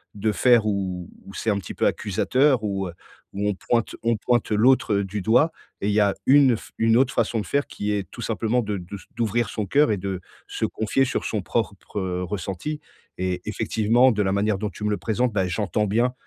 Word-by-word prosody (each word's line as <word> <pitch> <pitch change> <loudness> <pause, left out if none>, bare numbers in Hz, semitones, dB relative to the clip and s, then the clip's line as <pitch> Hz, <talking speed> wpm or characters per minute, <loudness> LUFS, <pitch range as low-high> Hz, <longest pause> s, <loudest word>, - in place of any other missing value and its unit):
de 105 +1 0
faire 120 +1 +4
où 95 -4 -2 0.2
où 100 - -11
c'est 110 - -2
un 100 - +2
petit - - -8
peu - - 0
accusateur 125 +5 +2
où 95 -2 -2
heu 85 - -8 0.4
où 100 +1 -1
on - - +1
pointe 115 +4 -1
on 115 0 +2
pointe 120 +1 0
l'autre 110 -1 +3
du 100 +1 -4
doigt 125 - +3 0.3
et 100 - -1
il - - +1
y 110 - +3
a 100 -1 +3
une 135 -3 +6
f - - -11
une 115 0 +3
autre 135 +1 +2
façon 115 0 0
de - - -7
faire 145 0 0
qui 105 0 -3
est 100 -2 -2
tout 120 - -9
simplement 115 +2 0
de 105 -2 -3
de 90 +2 -8
s 100 - -9 0.2
d'ouvrir 115 -1 0
son 105 - -3
cœur 140 +6 +3
et 105 - +1
de 95 -1 -4 0.3
se - - -2
confier 110 +5 0
sur 130 - -2
son 105 - -1
propre 100 0 -3 0.2
ressenti 100 - -4 0.4
et 90 -1 -2
effectivement 115 +4 +2
de 105 - 0
la 95 - +1
manière 100 +1 +1
dont 105 +2 -3
tu 105 - -10
me - - +1
le 105 - 0
présentes, 120 +1 -1
bah 95 -2 +1
j'entends 105 +3 -1
bien 120 +5 +1
105 Hz, 225 wpm, -24 LUFS, 100-120 Hz, 0.4 s, une